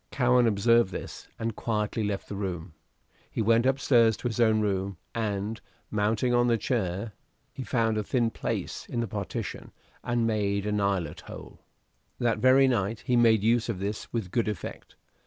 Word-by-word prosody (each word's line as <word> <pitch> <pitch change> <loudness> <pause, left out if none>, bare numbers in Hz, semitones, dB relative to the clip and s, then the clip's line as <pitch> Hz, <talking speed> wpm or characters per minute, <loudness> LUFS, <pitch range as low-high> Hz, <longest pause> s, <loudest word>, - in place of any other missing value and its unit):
Cowen 125 -2 +3
observed 115 0 +3
this, - - -7
and 115 -1 -3
quietly 110 -1 -1
left 100 -1 -3
the 100 - -6
room. 90 -4 -4 0.6
He - - -6
went 115 +3 +3
up 135 +1 +2
stairs 115 -5 +4
to - - -3
his 115 -1 -4
own 110 -2 +4
room, 100 -2 -1 0.2
and, 105 -1 -2 0.3
mounting 110 +4 +1
on 120 0 +3
a 115 - +3
chair, 105 -3 -2 0.4
he - - -6
found 115 -4 +1
a - - -1
thin 115 +1 0
place - - -4
in 120 - -2
the 115 - -1
partition 100 -2 -5 0.3
and 120 -1 0
made 100 -2 0
an 105 -1 0
eyelet 95 -6 -1
hole. - - -11 0.6
That 115 -3 0
very 130 +3 +6
night 110 -3 0
he 125 -1 0
made 115 -3 +4
use 115 +1 +2
of 110 - -2
this 100 +3 -4
with 110 -6 -3
good 115 0 +1
effect. 105 -6 -6
110 Hz, 175 wpm, -27 LUFS, 100-120 Hz, 0.6 s, very